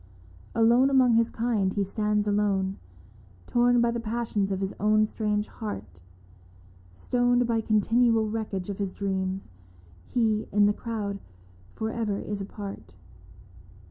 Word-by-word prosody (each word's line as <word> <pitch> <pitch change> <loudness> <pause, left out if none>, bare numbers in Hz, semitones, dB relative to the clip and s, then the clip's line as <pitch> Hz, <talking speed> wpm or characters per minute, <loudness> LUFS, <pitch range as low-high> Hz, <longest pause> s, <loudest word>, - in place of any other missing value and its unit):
Alone 235 +4 +5
among 260 -3 +4
his 230 0 +3
kind 220 -5 0
he 200 - +1
stands 210 +1 0
alone, 200 -2 0 0.7
Torn 245 0 +3
by 235 0 +2
the 235 - -2
passions 220 -3 -2
of 190 - -1
his 195 0 -3
own 215 +1 +4
strange 210 -1 -1
heart, 145 - -7 0.9
Stoned 245 - +1
by 230 -1 +1
continual 225 +1 +2
wreckage 210 -4 -3
of 195 - -7
his 195 -2 -2
dreams, 190 - -3 0.6
He 220 -3 0
in 205 +1 +4
the 205 - +3
crowd 205 -3 -4 0.6
for 220 0 -2
ever 220 -4 -2
is 205 -1 -4
apart. 195 - -8
210 Hz, 135 wpm, -27 LUFS, 200-230 Hz, 0.9 s, Alone